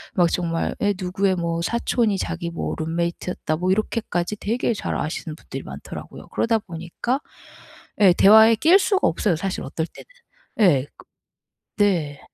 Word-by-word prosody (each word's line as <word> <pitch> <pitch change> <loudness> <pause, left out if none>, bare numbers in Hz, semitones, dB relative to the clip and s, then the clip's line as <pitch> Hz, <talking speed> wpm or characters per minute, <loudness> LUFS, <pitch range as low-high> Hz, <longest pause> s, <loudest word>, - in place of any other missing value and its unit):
막 175 -3 +3
정말 165 -2 -1
에 205 0 +2
"누구의 185 +1 0
뭐 170 -1 -2
사촌이 230 0 0
자기 170 0 -3
뭐 165 - -3
룸메이트였다." 170 0 -2
뭐 180 +3 -1
이렇게까지 210 -2 -1
되게 230 +3 -1
잘 - - -3
아시는 155 0 -4
분들이 - - -8
많더라고요. - - -9
그러다 230 -1 +1
보니까 190 - -4 0.8
예 190 -3 +7
대화에 220 +4 +7
낄 340 - +5
수가 390 0 +2
없어요, 170 +1 +1
사실 190 +2 -3
어떨 160 +4 -3
때는. - - -14 0.6
예 140 -1 0
그 - - -16 0.8
네. 160 -8 0
180 Hz, 315 characters per minute, -23 LUFS, 165-215 Hz, 0.8 s, 예